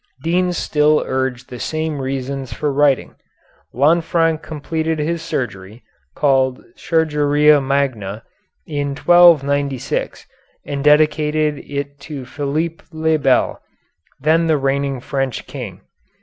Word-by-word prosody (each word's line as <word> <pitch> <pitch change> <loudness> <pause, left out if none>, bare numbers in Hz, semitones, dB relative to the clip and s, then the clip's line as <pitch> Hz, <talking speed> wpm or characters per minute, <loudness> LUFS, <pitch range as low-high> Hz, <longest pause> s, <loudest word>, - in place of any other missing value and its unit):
Deans 180 +1 +1
still 150 0 +2
urge 130 -1 -2
the 125 -2 -9
same 155 -2 -3
reasons 135 0 -4
for 145 +5 -2
writing. 140 -1 +2 0.6
Lanfranc 165 +3 +2
completed 160 +1 -3
his 160 +2 -2
surgery, 110 -8 -5 0.3
called 130 -3 +1
"Chirurgia 150 -2 +3
Magna," 130 -7 -1 0.4
in 145 -2 -3
1296, 145 -6 +3 0.4
and 140 -1 -4
dedicated 150 0 +3
it 140 0 -6
to 140 -2 -8
Philippe 155 +5 -3
le 160 -1 0
Bel, 135 -2 +1 0.6
the - - -24
then 165 0 0
reigning 135 0 -1
French 135 -1 -3
King. - - -8
145 Hz, 105 wpm, -19 LUFS, 135-155 Hz, 0.6 s, Chirurgia